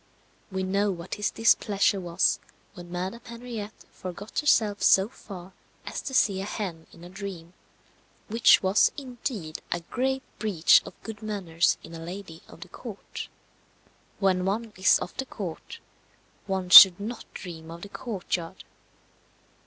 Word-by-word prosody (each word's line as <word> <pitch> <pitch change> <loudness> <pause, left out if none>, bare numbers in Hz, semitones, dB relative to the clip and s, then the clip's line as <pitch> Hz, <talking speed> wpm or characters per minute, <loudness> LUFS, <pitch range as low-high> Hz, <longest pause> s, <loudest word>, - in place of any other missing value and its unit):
We 190 0 -2
know 200 +2 +1
what 175 -2 -5
his 210 -1 -1
displeasure 205 -3 +2
was 175 0 +1 0.3
when 175 -2 -11
Madame 185 +6 -4
Henriette 235 -3 -8
forgot 185 +3 -6
herself 215 -9 +2
so 195 +1 +5
far 190 -7 -11 0.3
as - - -5
to 265 - -5
see 195 -5 +3
a - - -4
hen 180 -7 -5
in 170 - -15
a - - -9
dream 185 -3 -8 0.7
which 225 -1 +5
was, 190 +2 +4
indeed, 240 - -5
a 175 - -1
grave 265 +8 -2 0.2
breach 195 -7 +4
of - - -12
good 220 -2 -8
manners 190 -6 0
in 165 - -11
a 165 - -7
lady 170 0 -8
of - - -15
the - - -9
court. - - -8 0.9
When 185 -2 +2
one 215 +3 -2
is 185 - +5
of - - -7
the 265 - -2
court, 185 -10 -7 0.7
one 190 -2 -2
should 185 0 +11
not 225 +4 -7
dream 165 -3 -8
of 170 +1 -9
the 205 - -8
courtyard. 190 -6 -5
195 Hz, 150 wpm, -26 LUFS, 175-215 Hz, 0.9 s, should